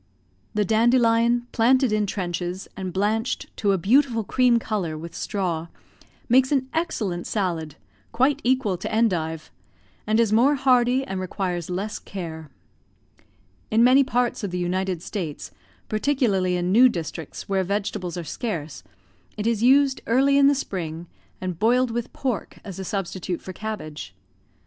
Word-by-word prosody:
The 210 -1 +2
dandelion 235 +1 +3
planted 255 +2 +3
in 210 -1 +1
trenches, 180 -1 -3
and 190 -1 -4
blanched 215 +5 -1
to 205 - +2
a 195 - +2
beautiful 230 - +3
cream 245 +3 +3
colour 195 -9 -2
with 165 +2 -8
straw, 170 -5 -2 0.6
makes 260 +2 +4
an 265 -3 +1
excellent 210 - -2
salad, 170 -7 -2 0.4
quite 265 +5 +2
equal 250 -7 +1
to - - -5
endive, 165 - 0 0.6
and 215 +1 +2
is 225 -2 +3
more 260 +6 +4
hardy 255 -1 +3
and 190 -7 -4
requires 180 -2 -3
less 195 +4 -3
care. 160 -5 -7 1.2
In 225 +2 +4
many 260 +3 +6
parts 245 -3 -1
of 200 - -1
the 180 - -4
United 180 0 -2
States, 170 -8 -5 0.4
particularly 215 -7 +1
in 175 +1 -1
new 250 +5 +7
districts 165 -5 -6
where 195 -1 +1
vegetables 185 -2 -3
are 175 - -4
scarce, 160 - -5 0.6
it 210 - -3
is 230 -2 +1
used 270 +2 +4
early 270 +4 +3
in 280 0 +6
the 285 - +4
spring, 170 - -4 0.3
and 180 -3 -4
boiled 245 +3 +3
with 235 +1 -3
pork 250 -7 -3
as 195 -3 -8
a - - -4
substitute 185 -2 -3
for 185 - -8
cabbage. 160 - -6
210 Hz, 150 wpm, -24 LUFS, 180-245 Hz, 1.2 s, new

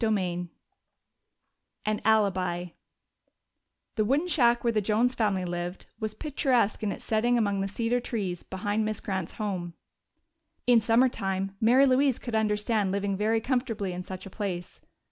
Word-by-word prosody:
CHAPTER 220 -1 +3 0.3
XV 175 - -6 1.4
An 215 0 0
Alibi 185 -5 +1 1.3
The 215 - +3
wooden 280 +10 +1
shack 240 -8 +3
where 235 -1 +2
the 215 - +2
Jones 225 +5 +2
family 205 -6 0
lived 175 +1 -4
was 215 -1 -3
picturesque 255 -6 +1
in 210 -2 -1
its - - -8
setting 235 +2 +2
among 200 -3 +1
the 195 - -1
cedar 230 +4 0
trees 200 -8 -3
behind 205 +3 -2
Miss 215 -1 -2
Grant's 190 -4 -3
home. 185 -5 -4 0.9
In 245 -2 +6
summer 230 +3 +4
time 195 -4 -3
Mary 250 +5 +6
Louise 265 -1 +3
could 240 -3 -5
understand 210 -1 +1
living 200 0 -1
very 215 +3 +1
comfortably 225 -6 -1
in 180 - -4
such 185 +1 -8
a 195 - -9
place. 180 -4 -5
215 Hz, 155 wpm, -28 LUFS, 195-235 Hz, 1.4 s, In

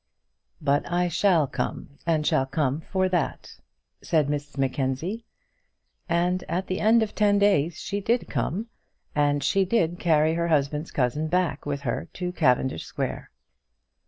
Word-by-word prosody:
"But 145 +2 0
I 175 0 +1
shall 170 -2 +3
come, 140 +1 -5
and 155 -2 +2
shall 135 - +2
come 140 +1 -1
for 185 -1 +2
that," 175 -5 -2 0.4
said 155 -3 +1
Mrs 145 0 -4
Mackenzie; 135 - -1 0.8
and 175 +2 +1
at 180 +3 -1
the 185 +1 -3
end 225 +2 +4
of 215 - -2
the - - -21
ten 205 -1 +4
days 185 -6 +3
she 200 0 -3
did 235 +4 0
come, 205 +7 -2 0.5
and 145 -1 +1
she 195 +6 +3
did 175 -4 0
carry 155 -1 +3
her 170 0 0
husband's 150 0 0
cousin 140 +4 0
back 170 -4 0
with 145 -1 -2
her 120 -11 -3
to 180 -1 -3
Cavendish 130 - +1
Square. - - -4
160 Hz, 155 wpm, -25 LUFS, 145-185 Hz, 0.8 s, end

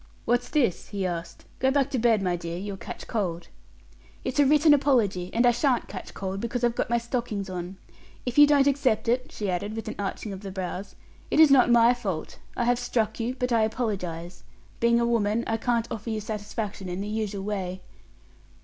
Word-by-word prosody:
"What's 245 +1 +1
this?" 250 - +1
he 200 -2 -2
asked. 170 -1 -5
"Go 260 - +3
back 280 0 +1
to 260 - 0
bed, 225 -3 +3
my 180 -2 +1
dear; 170 0 -5
you'll 200 +2 -5
catch - - -8
cold." 180 -7 -3 0.7
"It's - - -2
a 285 - +6
written 300 +1 +6
apology; 230 -11 +2
and 235 +2 +2
I 240 - +7
sha'n't 245 +1 +1
catch 190 - -8
cold, 190 0 -4
because 240 +1 -3
I've 240 -1 +3
got - - -2
my 235 - +3
stockings 235 -5 -3
on. 180 +1 -5 0.5
If 250 +3 +1
you 295 - +10
don't 285 -2 +4
accept 270 -6 +1
it," 250 +2 0
she 210 - -4
added, 195 +4 -2
with 225 - -5
an 215 - -3
arching 200 +1 -4
of 190 - -8
the 200 - -6
brows, 190 +1 -5 0.3
"it - - +1
is 315 -3 +8
not 260 -3 +6
my 235 0 +6
fault. 195 -10 -5 0.2
I 240 - +1
have 245 0 +2
struck 230 -3 -1
you, 235 +2 -2
but 250 0 -1
I 230 -1 +4
apologize. 190 -7 -3 0.4
Being 235 0 +4
a 235 - +2
woman, 230 -1 +1
I 225 - 0
can't 235 0 0
offer 225 +1 -5
you 220 -1 -1
satisfaction 210 -2 -5
in 180 +2 -3
the 205 - -4
usual 210 -2 -3
way." 190 -3 -3
220 Hz, 210 wpm, -26 LUFS, 195-245 Hz, 0.7 s, you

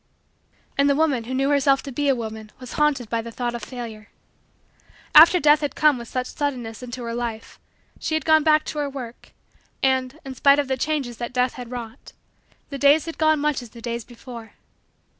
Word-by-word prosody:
And 280 +1 +4
the 280 - +3
woman 280 -6 +1
who 255 - -5
knew 275 +2 +1
herself 275 -1 +3
to 275 - -7
be 285 +2 0
a 270 - +4
woman 220 -2 -7
was 255 -1 -9
haunted 295 -5 +1
by 230 +1 -1
the 230 +1 -8
thought 240 0 -3
of 240 - -5
Failure. 220 -2 -8 1.1
After 335 +3 +9
Death 300 0 +5
had 290 - -3
come 300 -4 +3
with 235 - -9
such 255 +1 -3
suddenness 250 -6 -4
into 250 0 -7
her 230 0 -4
life, 235 -2 -5 0.4
she 315 - -2
had 315 - -2
gone 315 -1 +5
back 305 0 +4
to 300 - -4
her 290 -1 -1
work, 250 -4 -9 0.5
and, 260 +1 +1
in 270 - -6
spite 280 +2 +5
of 290 -2 0
the 265 - 0
changes 265 -3 -2
that 240 0 -5
Death 250 0 +1
had 245 -2 -8
wrought, 235 -2 -8 0.6
the 275 - -5
days 285 +2 +5
had 330 - -7
gone 310 -1 +3
much 295 -2 0
as 240 - -11
the 235 - -13
days 235 0 -4
before. 235 -1 -11
260 Hz, 210 wpm, -23 LUFS, 235-290 Hz, 1.1 s, After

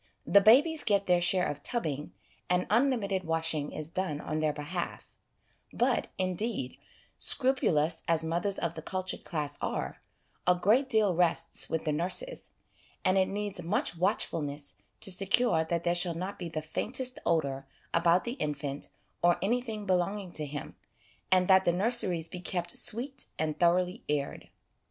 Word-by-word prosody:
The 200 - +5
babies 290 +10 +6
get 200 -2 +1
their 180 -1 +2
share 180 +1 +3
of 145 0 -4
tubbing, 150 - -3 0.4
and 180 0 +1
unlimited 220 -6 +1
washing 160 -2 -1
is 155 +1 -4
done 185 -6 -3
on 155 0 -4
their 155 -1 +1
behalf; 150 +4 -6 0.6
but, - - 0
indeed, 185 - -3 0.4
scrupulous 170 - +3
as 165 -1 +2
mothers 175 +5 0
of 170 -1 -2
the 160 - -7
cultured 185 +2 -4
class 150 -3 -4
are, - - -4 0.5
a 180 - +5
great 225 +10 +2
deal 215 -6 +2
rests 165 -1 +3
with 160 0 -2
the 155 - 0
nurses, 185 - 0 0.6
and 185 - +3
it 190 -1 +3
needs 205 -2 -3
much 175 +1 0
watchfulness 150 -4 -1 0.3
to 195 - +5
secure 195 -1 +3
that 170 +1 -2
there 175 - +1
shall 175 -1 -1
not 185 +4 -5
be 175 -2 -5
the 155 -1 -5
faintest 250 +10 -3
odour 140 -5 -1 0.3
about 170 +1 +3
the 235 - -4
infant 145 -1 -4 0.3
or 175 0 +3
anything 220 0 -2
belonging 185 +1 -1
to 150 -3 -3
him, 145 0 -7 0.6
and 185 -1 +4
that 190 0 +5
the 175 - +2
nurseries 185 -4 +1
be 180 - -8
kept 175 -1 -1
sweet 260 +4 +2
and 155 -1 -3
thoroughly 180 +4 +1
aired. 145 -1 -3
180 Hz, 155 wpm, -29 LUFS, 160-200 Hz, 0.6 s, babies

